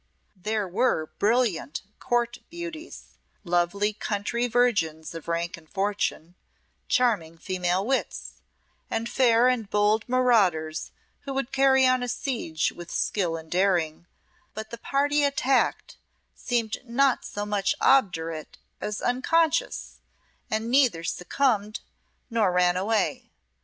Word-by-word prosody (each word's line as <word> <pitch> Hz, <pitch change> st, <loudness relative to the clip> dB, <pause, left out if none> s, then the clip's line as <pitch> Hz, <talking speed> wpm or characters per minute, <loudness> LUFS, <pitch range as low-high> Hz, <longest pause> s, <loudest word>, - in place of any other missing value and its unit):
There 210 Hz, +2 st, -2 dB
were 185 Hz, -5 st, 0 dB
brilliant 210 Hz, -, +1 dB, 0.2 s
Court 240 Hz, 0 st, 0 dB
beauties 340 Hz, -1 st, -9 dB, 0.2 s
lovely 175 Hz, +4 st, +1 dB
country 220 Hz, +3 st, -2 dB
virgins 200 Hz, -11 st, +1 dB
of 165 Hz, -1 st, -9 dB
rank 170 Hz, +2 st, -2 dB
and 160 Hz, -2 st, -18 dB
fortune 195 Hz, -4 st, -2 dB, 0.5 s
charming 200 Hz, -10 st, +1 dB
female 185 Hz, +1 st, -1 dB
wits, 265 Hz, +2 st, -3 dB, 0.5 s
and 225 Hz, +1 st, -2 dB
fair 240 Hz, -1 st, +4 dB
and 240 Hz, -5 st, 0 dB
bold 210 Hz, +2 st, +2 dB
marauders 200 Hz, -12 st, +2 dB, 0.3 s
who 275 Hz, -1 st, -6 dB
would 270 Hz, -1 st, -2 dB
carry 265 Hz, -1 st, +4 dB
on 255 Hz, 0 st, +3 dB
a 245 Hz, -, -2 dB
siege 225 Hz, -, -2 dB
with 175 Hz, -1 st, -10 dB
skill 175 Hz, -5 st, -1 dB
and 160 Hz, 0 st, -12 dB
daring; 175 Hz, -3 st, +1 dB, 0.5 s
but 220 Hz, +1 st, -6 dB
the 235 Hz, -, -7 dB
party 290 Hz, +3 st, +1 dB
attacked 275 Hz, -1 st, +1 dB, 0.4 s
seemed 230 Hz, -3 st, -1 dB
not 260 Hz, +2 st, +2 dB
so 205 Hz, 0 st, -5 dB
much 205 Hz, -2 st, 0 dB
obdurate 165 Hz, -, +1 dB, 0.2 s
as 210 Hz, 0 st, -4 dB
unconscious, 325 Hz, -, 0 dB, 0.5 s
and 220 Hz, +2 st, -2 dB
neither 250 Hz, -11 st, +3 dB
succumbed 215 Hz, -, 0 dB, 0.5 s
nor 225 Hz, -5 st, +1 dB
ran 180 Hz, 0 st, +3 dB
away. 205 Hz, +2 st, 0 dB
215 Hz, 120 wpm, -26 LUFS, 180-250 Hz, 0.5 s, fair